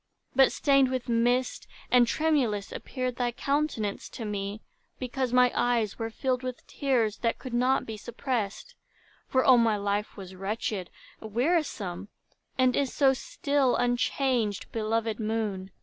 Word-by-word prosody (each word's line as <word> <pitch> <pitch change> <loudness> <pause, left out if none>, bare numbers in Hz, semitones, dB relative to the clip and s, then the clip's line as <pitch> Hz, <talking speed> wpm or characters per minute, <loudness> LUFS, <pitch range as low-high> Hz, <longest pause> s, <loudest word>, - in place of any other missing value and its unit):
But 265 0 +6
stained 275 -2 +3
with 255 -2 -3
mist, 240 +2 +1 0.2
and 245 -1 +6
tremulous, 255 -10 +1
appeared 255 -2 -4
Thy 245 -1 0
countenance 270 -5 -1
to 230 - -7
me, 205 0 -4 0.3
because 255 0 -2
my 250 0 +5
eyes 240 -4 0
Were 225 0 -2
filled 255 +2 -1
with 255 -1 -6
tears, 240 -7 0
that 230 -1 0
could 255 - -8
not 255 +2 +2
be 220 -1 -6
suppressed; 240 - -3 0.5
For, 260 0 +2
oh, 255 -2 +7
my 225 -2 +3
life 205 +1 -2
was 190 -2 -9
wretched, 195 0 -3 0.3
wearisome, 220 - -1 0.5
And 255 -1 +3
is 275 -2 +1
so 270 -2 +4
still, 280 0 0
unchanged, 245 -3 0
belovèd 225 0 -1
moon! 215 -4 -2
240 Hz, 140 wpm, -28 LUFS, 215-260 Hz, 0.5 s, oh